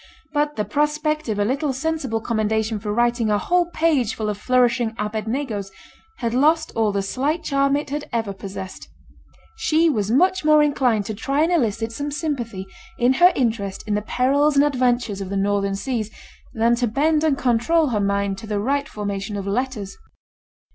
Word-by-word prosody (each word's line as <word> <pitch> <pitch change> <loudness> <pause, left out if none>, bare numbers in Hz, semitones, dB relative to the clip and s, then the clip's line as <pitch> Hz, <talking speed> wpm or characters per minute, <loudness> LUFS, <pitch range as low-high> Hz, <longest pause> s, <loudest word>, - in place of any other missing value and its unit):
But 295 0 0
the 210 - -1
prospect 300 +4 -1
of 215 - -1
a 205 - +1
little 275 +4 0
sensible 270 -5 -2
commendation 220 -1 -1
for 210 +1 -4
writing 240 0 +1
a 210 - +3
whole 350 - +1
page 310 -9 +1
full 215 -1 -2
of 205 - -3
flourishing 240 -2 +2
'Abednegos,' 215 0 -3 0.5
had 235 -2 -2
lost 310 +5 +3
all 220 -2 +2
the 200 -1 -1
slight 285 - -1
charm 275 -1 +2
it 290 -1 -5
had 295 +1 -4
ever 225 -4 -2
possessed. 190 -1 -8 0.7
She 325 -5 +3
was 210 -6 -1
much 370 +9 +3
more 305 0 +5
inclined 250 -8 +1
to 215 - -4
try 275 +8 0
and 335 - +1
elicit 225 - 0
some 285 +5 -4
sympathy 250 - -3 0.3
in 245 +2 +3
her 360 +1 +8
interest 220 -6 -1
in 210 - 0
the 210 - 0
perils 280 +6 +2
and 280 +1 +5
adventures 245 -7 0
of 190 - -5
the 200 - -2
northern 200 0 0
seas, 220 0 -3 0.4
than 230 +1 +2
to 245 0 +1
bend 300 +7 +1
and 300 -4 +2
control 265 +6 +2
her 215 -4 0
mind 200 -1 0
to 225 - -9
the 210 -1 -1
right 280 +6 -1
formation 205 0 -4
of 195 - -4
letters. 210 -1 -3
240 Hz, 180 wpm, -22 LUFS, 210-290 Hz, 0.7 s, her